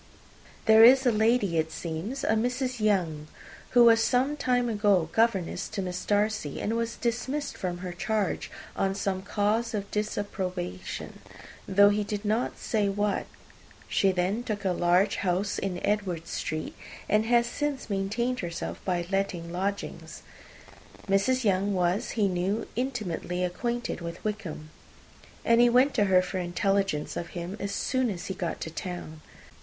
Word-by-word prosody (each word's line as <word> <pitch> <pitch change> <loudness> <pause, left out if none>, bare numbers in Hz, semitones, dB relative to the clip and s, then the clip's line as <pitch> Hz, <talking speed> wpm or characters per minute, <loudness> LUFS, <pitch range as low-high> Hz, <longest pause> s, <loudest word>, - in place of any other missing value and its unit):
There 220 0 +8
is 260 +3 +8
a 245 - +5
lady, 215 -5 +2
it 160 0 -1
seems, 180 - -4
a - - 0
Mrs. 250 +3 0
Younge, 175 -8 +1 0.5
who 240 - +9
was 225 -1 +6
some 260 +5 +2
time 250 -4 +1
ago 205 -7 +2
governess 220 -6 +1
to 215 -3 -3
Miss 180 0 -4
Darcy, 210 -7 0
and 225 - -1
was 230 0 -2
dismissed 260 +5 -2
from 180 -2 -3
her 180 - -4
charge 210 +3 -1 0.3
on 195 0 0
some 195 -2 -1
cause 215 +3 0
of 200 -1 -4
disapprobation, 185 - -4 0.5
though 200 +1 +6
he 210 +1 +1
did 205 0 -4
not 220 +4 0
say 210 -3 0
what. 205 +1 -1 0.6
She 195 - +3
then 185 +5 0
took 215 -4 -4
a 190 - +3
large 180 +3 +2
house 190 +2 0
in 185 -2 -3
Edward 190 -6 -1
Street, 155 0 -4 0.3
and 215 +1 +2
has 235 0 +4
since 290 +2 -3
maintained 220 +5 -1
herself 170 -2 -5
by 175 -2 -1
letting 190 -4 -1
lodgings. 195 +3 -4 0.8
This 195 0 +2
Mrs. 260 0 +1
Younge 200 -1 +2
was, 180 +2 +1
he 205 -2 +3
knew, 185 +3 -1
intimately 205 -8 -2
acquainted 235 +5 -2
with 170 0 -7
Wickham; 185 -8 -5 0.7
and 230 0 +5
he 240 - +6
went 255 +4 +4
to 210 -4 +3
her 185 -2 +4
for 185 +1 -3
intelligence 190 -2 0
of 170 - -4
him, 175 +3 -4
as 200 - -3
soon 260 +2 0
as 180 -4 -5
he 190 - -3
got 180 -3 -4
to 160 - -4
town. 165 -2 -6
200 Hz, 160 wpm, -28 LUFS, 180-230 Hz, 0.8 s, who